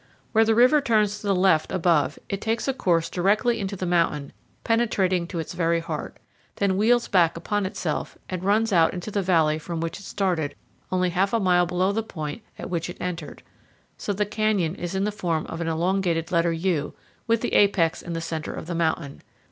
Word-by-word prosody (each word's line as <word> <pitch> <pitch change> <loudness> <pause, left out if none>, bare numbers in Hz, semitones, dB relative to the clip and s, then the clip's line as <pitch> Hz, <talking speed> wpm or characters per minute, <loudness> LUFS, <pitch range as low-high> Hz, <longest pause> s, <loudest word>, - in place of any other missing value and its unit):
Where 220 0 +5
the 225 0 +3
river 255 +6 +5
turns 210 -5 +1
to 205 - -6
the 195 - +3
left 180 -4 +3
above, 165 -5 +2
it 195 0 -4
takes 225 +2 -1
a 270 - +1
course 170 -9 +1
directly 215 +7 +1
into 200 -1 -3
the 185 - -4
mountain, 165 -5 0 0.3
penetrating 195 -7 +1
to 175 - -6
its 165 - -4
very 170 -1 +1
heart, 165 -2 -5 0.4
then 200 -2 +1
wheels 230 +4 +3
back 170 -3 +3
upon 205 +3 -1
itself, 165 -5 -4
and 185 -1 -4
runs 210 +2 +2
out 165 -1 +4
into 180 +4 -5
the 200 - 0
valley 160 -4 +2
from 165 +1 -5
which 165 +3 -4
it - - -12
started 180 -8 -1 0.4
only 180 -1 +1
half 195 +4 +1
a 230 - +3
mile 180 -3 +3
below 180 +2 +1
the 220 +2 0
point 160 -3 -6 0.2
at - - -6
which 170 -1 -3
it - - -8
entered; 175 -4 -5 0.5
so - - -4
the 205 +1 0
canyon 205 -6 0
is 175 -1 -5
in 190 - 0
the 210 - 0
form 170 -6 -2
of 165 - -6
an 165 - -2
elongated 170 0 0
letter 170 -1 +2
U, 165 -3 -1 0.3
with 230 0 +2
the - - -2
apex 185 -5 +3
in 170 - -6
the 165 - -3
center 160 -1 -4
of - - -6
the 175 - -4
mountain. 160 -4 -1
180 Hz, 210 wpm, -25 LUFS, 165-205 Hz, 0.5 s, Where